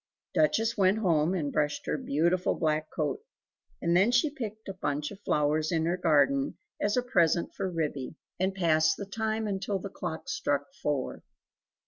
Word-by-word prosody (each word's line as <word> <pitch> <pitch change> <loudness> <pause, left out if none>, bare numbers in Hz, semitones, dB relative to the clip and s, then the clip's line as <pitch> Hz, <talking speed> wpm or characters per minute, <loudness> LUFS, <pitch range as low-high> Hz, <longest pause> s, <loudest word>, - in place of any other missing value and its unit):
Duchess 220 +10 +2
went 195 0 +3
home 170 -4 +2
and 150 -6 -2
brushed 150 0 0
her - - 0
beautiful 175 - +1
black 155 -1 0
coat; 155 - -2 0.6
and 170 0 +2
then 195 +5 +5
she 245 +5 +3
picked 220 -6 -6
a 195 - -4
bunch 150 -5 -2
of 200 - -10
flowers 155 -1 +1
in 160 -2 +1
her 170 +2 +1
garden 140 -6 +2 0.2
as 205 +3 +1
a 250 - +2
present 170 -9 +2
for 195 -1 -2
Ribby; 155 -5 -3 0.2
and 190 +1 0
passed 160 -3 +3
the 200 - -5
time 220 +2 -2
until 200 0 -1
the 195 +1 -6
clock 160 -5 -5
struck 145 -1 0 0.2
four. 145 -3 -2
170 Hz, 170 wpm, -29 LUFS, 155-200 Hz, 0.6 s, then